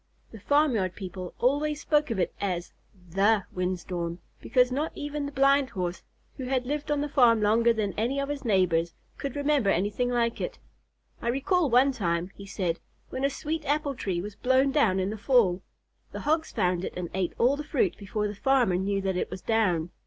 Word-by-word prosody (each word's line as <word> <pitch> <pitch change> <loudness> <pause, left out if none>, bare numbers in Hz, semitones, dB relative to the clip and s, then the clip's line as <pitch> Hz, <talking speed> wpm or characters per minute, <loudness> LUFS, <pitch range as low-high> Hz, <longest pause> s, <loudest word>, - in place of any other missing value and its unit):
The 220 - -10
farmyard 230 - +2
people 185 -2 -7
always 290 +4 +1
spoke 300 -3 +2
of 225 - -2
it 180 - 0
as 180 -3 -2 0.4
"the" 200 +3 +3
wind 180 0 -2
storm, 170 -2 -4 0.2
because 250 -1 +3
not 295 +5 -1
even 290 0 -4
the - - -6
Blind 275 -1 +3
Horse, 180 -1 -3 0.4
who 260 - -5
had 255 -1 0
lived 295 +2 -3
on 295 -1 +1
the 295 - -1
farm 245 -6 +4
longer 225 +3 +4
than 215 -4 -1
any 250 +5 0
of 275 - -1
his 290 -1 -4
neighbors, 180 -6 +2 0.2
could 275 -3 -4
remember 285 -6 +2
anything 205 +7 +1
like 235 -1 0
it. - - -4 0.6
"I - - -4
recall 290 +6 +1
one 255 +3 +5
time," 175 -6 -1
he 200 - -11
said, 180 -4 -2 0.3
"when 260 - -4
a 275 - +3
sweet 315 +3 -4
apple 290 0 0
tree 190 -8 -2
was 210 +1 -6
blown 260 +4 +2
down 220 -10 +3
in 190 +2 -1
the 215 - -6
fall. 200 -5 +3 0.5
The - - -5
Hogs 315 +2 0
found 180 0 0
it - - -4
and 175 -2 -4
ate 185 -1 -1
all 255 +4 +3
the 295 - -5
fruit 270 - 0
before 210 +1 -2
the 205 - -4
farmer 245 -4 +2
knew 195 +1 0
that 190 -1 -1
it - - -2
was 185 - -8
down. 180 -7 +1
230 Hz, 205 wpm, -27 LUFS, 190-275 Hz, 0.6 s, one